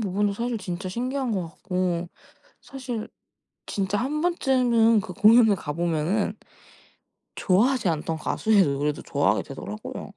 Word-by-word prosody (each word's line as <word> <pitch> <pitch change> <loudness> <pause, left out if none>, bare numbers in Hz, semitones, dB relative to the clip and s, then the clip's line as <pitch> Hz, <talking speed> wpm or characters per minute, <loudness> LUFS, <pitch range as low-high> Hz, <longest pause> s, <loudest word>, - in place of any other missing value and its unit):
부분도 205 0 0
사실 235 +3 -2
진짜 185 -1 -5
신기한 250 +4 -2
것 190 -3 -1
같고 180 -1 -2 0.5
사실 250 -5 -6 0.6
진짜 200 0 -1
1 295 +5 -1
번쯤은 250 -9 +3
그 185 -2 -8
공연에 220 +2 +6
가 150 -5 -5
보면은 170 +6 -1 1.0
좋아하지 210 +2 +2
않던 160 0 -2
가수의 210 +5 +2
노래도 145 -1 -1
좋아하게 - - +1
되더라고요. 105 +1 -7
205 Hz, 290 characters per minute, -25 LUFS, 175-240 Hz, 1.0 s, 공연에